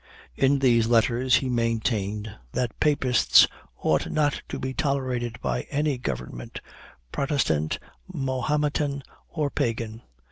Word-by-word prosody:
In 135 +1 +3
these 120 -4 +3
letters 120 +2 +3
he 130 +1 +1
maintained 110 -3 -1 0.2
that 120 -3 -2
Papists 135 -6 +5 0.4
"ought 80 - +2
not 145 -2 +1
to - - -4
be 130 0 -3
tolerated 130 -5 -1
by 60 -1 -2
any 145 -2 0
government 60 - -5 0.5
Protestant, 110 - 0 0.3
Mohometan, 140 +2 -1 0.3
or 150 -3 -2
Pagan." 115 -1 -2
125 Hz, 110 wpm, -26 LUFS, 110-140 Hz, 0.5 s, Papists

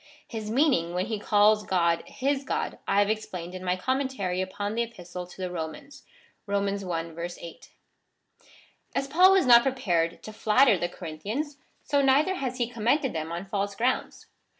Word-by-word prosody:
His 220 -2 -5
meaning, 225 - +2
when 180 +1 0
he 220 -1 -3
calls 210 0 +4
God 170 -4 +1
his 275 +1 -1
God, - - -3
I 195 - +1
have 205 0 +4
explained 180 -5 -5
in 185 0 -7
my 180 0 +1
Commentary 255 -5 -1
upon 205 +2 -3
the 235 - 0
Epistle 180 -6 -6
to 180 - -15
the 185 -1 -3
Romans 180 - -7 0.5
(Rom. 200 0 0
i. 170 -4 -3
8.) 170 - -11 1.3
As 275 - 0
Paul 360 +7 +6
was 385 -2 +4
not 240 -1 +8
prepared 180 -11 0
to 215 - -8
flatter 220 +3 +4
the 175 -1 -2
Corinthians, 210 - -5 0.3
so 285 -1 +2
neither 280 +7 +4
has 260 -8 -3
he 240 -2 0
commended 245 +4 0
them 160 0 -4
on 170 +3 -4
false 200 0 -2
grounds. 250 +4 -1
210 Hz, 170 wpm, -27 LUFS, 180-260 Hz, 1.3 s, not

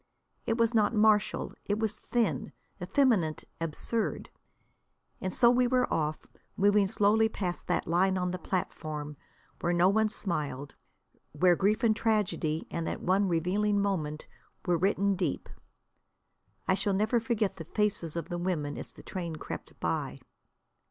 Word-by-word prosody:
It 230 - +1
was 230 0 +2
not 220 0 +3
martial. 210 -1 +3
It 205 - 0
was 215 -1 -1
thin, 240 -2 -1 0.3
effeminate, 220 - +2 0.2
absurd. 165 +8 -2 0.9
And 185 - -2
so 235 +4 +5
we 250 0 +3
were 250 0 +3
off, 155 -1 -1 0.3
moving 205 0 +4
slowly 210 +3 +3
past 180 -5 -4
that - - 0
line 185 +3 +2
on 180 -1 -1
the 185 - -4
platform, 155 -5 -4 0.4
where 175 - 0
no 175 +2 +4
one 220 +2 +2
smiled; 145 -9 -3 0.6
where 175 +4 +4
grief 205 +5 +1
and 220 -2 +4
tragedy, 205 -8 0
in 165 -1 -2
that - - -4
one 195 +2 +2
revealing 195 +5 +1
moment, 160 -7 -1 0.4
were 175 - +2
written 195 +3 +2
deep. 175 -6 -2 1.2
I - - +4
shall 200 +1 0
never 220 +4 +2
forget 220 -4 -1
the 165 - -7
faces 195 -4 -1
of 170 -2 -3
the 175 -1 -4
women 160 -5 -2
as - - -8
the - - -14
train 170 -4 -5
crept 155 - -8
by. - - -2
195 Hz, 150 wpm, -29 LUFS, 170-215 Hz, 1.2 s, so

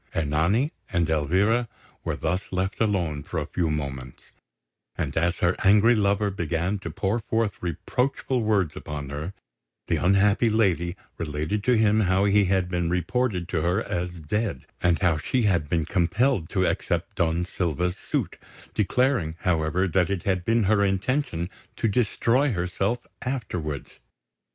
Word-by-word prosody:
Ernani 80 - +1 0.2
and 85 -3 +1
Elvira 95 +10 +2 0.3
were - - -2
thus 90 +4 -2
left 95 +3 -2
alone 90 -9 0
for - - -6
a - - -3
few 85 -3 -1
moments; 70 -4 -5 0.7
and - - -2
as 85 +1 +1
her 85 0 +3
angry 105 +4 +6
lover 100 -1 +2
began 85 +2 -1
to 90 - -6
pour 95 +7 -1
forth 115 -1 -1
reproachful 125 - -1
words 105 -7 +1
upon 75 -2 -6
her, 75 +5 -4 0.5
the - - +1
unhappy 100 +5 +3
lady 95 -5 +1 0.2
related 75 +6 -2
to 125 -2 +4
him 110 0 +4
how 95 -1 +3
he 100 0 +4
had 95 -1 +1
been 90 -2 -1
reported 90 +1 0
to 80 - 0
her 90 +7 +1
as 90 +1 -2
dead, 100 - -2 0.2
and 85 -2 +3
how 85 -4 +3
she 125 +9 0
had 90 -8 +1
been 80 -1 +1
compelled 95 - +1
to 95 -2 +1
accept - - -1
Don 85 +1 +1
Silva's 90 0 -1
suit, - - -3 0.3
declaring, 105 - +1
however, 85 +1 +1
that 90 0 +2
it 100 -3 -2
had 95 -2 0
been 115 +3 +2
her 100 +1 +3
intention 100 - 0 0.3
to 115 - 0
destroy 120 +4 +2
herself 95 +6 -1 0.2
afterwards. 90 - -4
95 Hz, 150 wpm, -25 LUFS, 85-105 Hz, 0.7 s, angry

